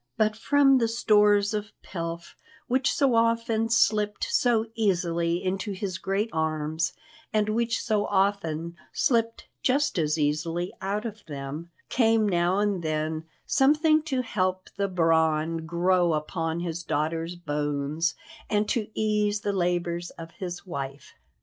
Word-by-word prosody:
But 215 0 +2
from 275 +3 +4
the 230 - +2
stores 210 -2 +3
of 210 0 -3
pelf 170 -1 -6 0.3
which 260 +1 +1
so 275 -4 +2
often 230 -1 +2
slipped 210 -3 +2
so 235 -3 +2
easily 170 -5 0
into 195 +2 -2
his 185 -2 -4
great 200 +4 -1
arms, 160 +1 -1 0.4
and 215 -1 +1
which 230 +1 0
so 210 -2 0
often 170 -4 0
slipped 230 -2 0
just 280 -4 +1
as 155 0 +1
easily 160 +4 -1
out 200 +3 -2
of 215 -2 -6
them, 145 +3 -6 0.2
came 225 -3 +3
now 175 0 +2
and 205 -3 +1
then 155 0 -2 0.2
something 305 +3 +4
to 260 -2 0
help 185 -4 -2
the 200 0 0
brawn 165 -2 +1
grow 175 0 +2
upon 165 +2 -2
his 170 -1 -3
daughter's 165 +3 -2
bones 150 0 -1 0.3
and 210 0 +1
to 225 -4 0
ease 210 -1 +1
the 205 - -1
labours 175 -1 -1
of 165 0 -9
his 175 0 -6
wife. 140 -5 -6
185 Hz, 135 wpm, -26 LUFS, 165-215 Hz, 0.4 s, from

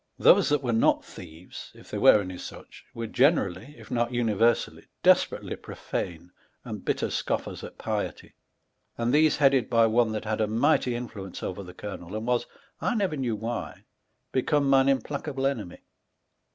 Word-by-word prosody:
Those - - +5
that 145 -1 +1
were 120 -2 0
not 115 - +3
thieves 85 0 -11
(if - - -16
there - - -3
were 105 - +7
any 90 -2 -7
such) - - -10
were 115 - -4
generally 130 - +1
(if - - -14
not 120 0 0
universally) 115 -1 +1 0.2
desperately - - +3
profane 90 0 -6 0.3
and - - -6
bitter - - 0
Bcofters - - -3
at - - -9
pietie, - - -4 0.6
and 120 +2 0
these 155 +1 +4
headed 135 -3 +3
by 115 -1 +4
one 115 0 +2
that 110 0 -4
had 110 0 -1
a 110 - +2
mighty 125 +2 +2
influence 105 -6 -7
over 95 +2 -4
the 90 -1 -11
colonell, 95 -2 -7
and 110 +1 -4
was 125 0 0 0.3
(I 240 - 0
never 195 -7 0
knew 125 -5 -1
why) 110 -3 -5 0.5
become 140 +2 +1
mine 135 0 +5
implacable 135 0 -2
enemy. 110 -10 -2
115 Hz, 165 wpm, -27 LUFS, 105-135 Hz, 0.6 s, were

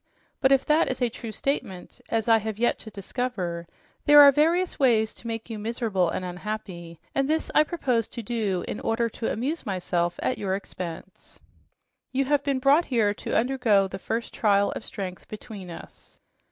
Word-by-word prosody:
But 265 - +4
if 270 -1 +4
that 310 +2 +3
is 255 - -3
a 245 - +1
true 230 -1 -7
statement, 215 -7 -4
as 225 -1 0
I 225 -1 +6
have 215 -1 -4
yet 240 +2 +1
to 220 - -9
discover, 195 -5 -4 0.4
there 295 0 +8
are 285 -1 +10
various 335 +6 +1
ways 225 -5 +3
to 235 - -11
make 225 -1 -4
you 225 -2 -6
miserable 215 -5 0
and 185 - -3
unhappy, 180 -3 -6
and 275 +1 0
this 320 +1 0
I - - +6
propose 260 - 0
to 235 - -7
do 205 -5 -1
in - - -4
order 230 +1 0
to 225 - -3
amuse 280 +9 -2
myself 175 -3 -1
at 255 - 0
your 190 -2 -1
expense. 185 -2 -8 0.7
You 270 +1 +1
have 290 +1 +2
been 275 -1 0
brought 280 +6 +4
here 220 -5 +2
to - - -2
undergo 230 -5 +3
the 190 0 -7
first 230 +4 -3
trial 200 -2 +2
of - - -6
strength 185 -3 -6
between 210 -3 -9
us." 170 - -12
225 Hz, 185 wpm, -26 LUFS, 195-260 Hz, 0.7 s, are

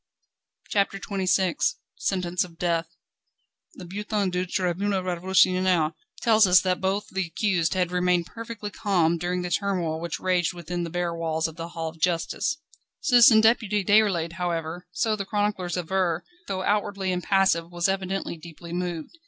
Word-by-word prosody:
CHAPTER 200 -1 +1
XXVI 190 - 0 0.2
Sentence 180 -2 -1
of 170 -2 -12
death. 170 -2 0 0.9
The 180 - -9
"Bulletin 205 +1 -2
du 180 +1 -1
Tribunal 190 +2 -1
Révolutionnaire" 185 -2 +2 0.3
tells 220 -3 +5
us 180 0 +7
that 185 -1 -1
both 195 +2 -1
the 190 -2 -1
accused 175 -1 0
had 180 -1 0
remained 180 -1 +2
perfectly 225 0 -7
calm 175 -6 +1
during 180 +1 -2
the 180 - -4
turmoil 175 -6 -1
which 170 -2 -4
raged 180 -1 +1
within 175 +1 -4
the 170 - -4
bare 175 0 -2
walls 160 -1 -1
of 160 - -10
the 165 -1 -6
Hall 165 -1 -5
of 160 0 -15
Justice. 180 - 0 0.4
Citizen 235 -3 +6
Deputy 220 -3 +2
Déroulède, 195 -6 +3
however, 170 0 -3
so 215 +5 0
the 200 - -3
chroniclers 205 -3 -1
aver, 180 -1 0 0.2
though 190 -1 -2
outwardly 200 -2 0
impassive, 180 -2 +1
was 175 +1 0
evidently 195 -1 -2
deeply 170 +1 -10
moved. 175 - -4
180 Hz, 155 wpm, -25 LUFS, 170-195 Hz, 0.9 s, us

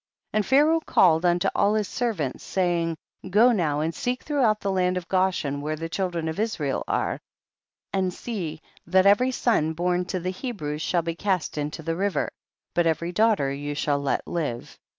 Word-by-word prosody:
52. - - -1
And 210 - 0
Pharaoh 300 +5 +5
called 175 - +3
unto 175 +2 +2
all 205 +1 +2
his 210 -2 0
servants, 200 - -2
saying, 170 -3 0 0.3
go 220 +6 +5
now 155 -9 +1
and 160 +2 -1
seek 250 +9 -2
throughout 250 -8 +2
the 200 - -1
land 180 -1 +1
of 180 -1 -5
Goshen 185 -7 0
where 155 +1 -2
the 165 +1 -5
children 175 -3 -2
of 160 +4 -3
Israel 165 -11 -1
are, - - -1 0.7
and 190 -1 +1
see 175 -7 -5 0.2
that 185 +2 +4
every 205 +6 +5
son 220 -11 +1
born 180 +2 0
to 185 0 -3
the 180 +1 -2
Hebrews 180 - -4
shall 170 +1 +1
be 165 0 -2
cast 185 -1 -1
into 150 +2 -4
the 165 +1 -1
river, 200 +2 -1 0.4
but 175 0 +2
every 170 +2 0
daughter 200 -8 +2
you 145 +1 -4
shall 145 -1 0
let 140 -1 -1
live. 145 -9 -4
180 Hz, 185 wpm, -25 LUFS, 160-205 Hz, 0.7 s, Pharaoh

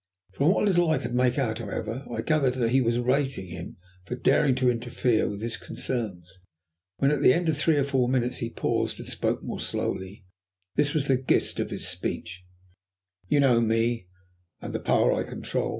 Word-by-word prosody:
From 140 - +2
what 205 - +2
little 175 -4 +3
I 155 - +3
could 130 -2 -4
make 125 +1 +2
out, 115 -5 0
however, 115 +4 -5
I 115 - -2
gathered 135 -2 +2
that 120 -3 0
he 130 +1 +4
was 115 -1 +1
rating 130 -3 0
him 85 0 -8 0.3
for 125 - -4
daring 135 +1 +3
to 130 0 +1
interfere 120 -1 +1
with 100 +1 -6
his 115 -1 0
concerns. 95 -7 -4 0.6
When, 140 +1 +3
at 145 -2 0
the 130 - +6
end 175 0 0
of 155 - +2
three 155 +1 +2
or 140 - +3
four 135 -3 +1
minutes, 125 -1 0
he 115 - -3
paused - - -1
and - - -8
spoke - - -2
more - - -5
slowly, 95 +1 -4 0.5
this 145 +1 +1
was 140 -2 +1
the 135 - +4
gist 130 0 +1
of - - -1
his - - -4
speech 90 +1 -4 0.8
"You 145 - +3
know 125 -4 +4
me 115 -2 0 0.5
and - - -7
the - - -1
power - - +3
I - - 0
control. - - -3
125 Hz, 200 wpm, -26 LUFS, 115-140 Hz, 0.8 s, the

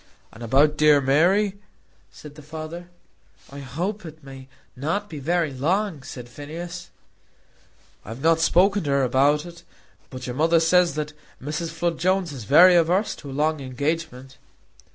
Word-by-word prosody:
"And 110 - -14
about 140 +6 +2
dear 150 -1 +5
Mary?" 185 +9 +2 0.5
said 150 -1 -13
the 150 - -13
father. 160 +3 -8 0.6
"I 140 - -9
hope 175 +11 -4
it 160 -2 -11
may 135 -1 -11 0.3
not 165 +11 -2
be 150 - -6
very 165 0 -1
long," 170 +4 -1
said 125 -2 -9
Phineas. 165 +7 -8 1.1
"I - - -12
have 115 +4 -8
not 165 0 +4
spoken 190 +4 +3
to - - -2
her 140 -1 +2
about 140 +5 +2
it, 170 -1 -12 0.5
but 130 -1 -8
your 125 - -5
mother 165 +3 +3
says 170 0 +3
that 150 0 -4 0.3
Mrs. 150 +4 -4
Flood 165 0 -2
Jones 185 -1 0
is 125 -6 -8
very 175 - +7
averse 175 +5 +2
to 140 - -10
a - - -7
long 150 +3 0
engagement." 135 0 -4
155 Hz, 160 wpm, -23 LUFS, 140-175 Hz, 1.1 s, very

